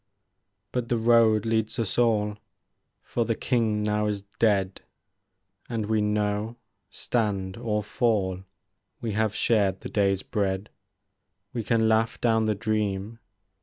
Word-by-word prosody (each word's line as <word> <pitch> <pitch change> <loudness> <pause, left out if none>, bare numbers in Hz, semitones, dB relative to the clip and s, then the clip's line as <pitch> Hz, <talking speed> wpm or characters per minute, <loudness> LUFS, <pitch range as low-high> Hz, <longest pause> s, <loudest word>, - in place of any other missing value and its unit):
But 125 -2 -2
the 120 - +2
road 115 -2 +4
leads 110 0 0
us 115 -1 -1
all. 105 -3 +2 0.6
For 120 - -1
the 115 0 -1
King 110 -4 0
now 105 0 +1
is 100 -1 -2 0.2
dead; 100 -4 +2 0.9
And 115 -3 -2
we 110 0 +1
know, 105 +2 -1 0.3
stand 100 -5 -1
or 110 -3 -1
fall. 100 -4 0 0.6
We 115 - -3
have 110 0 0
shared 100 -5 +2
the - - -6
day's 100 -2 +1
bread* 100 0 -2 0.8
We 120 -2 -2
can 115 0 +2
laugh 110 0 +2
down 110 -2 +2
the 110 -1 +1
dream. 105 0 -2
110 Hz, 130 wpm, -26 LUFS, 105-115 Hz, 0.9 s, road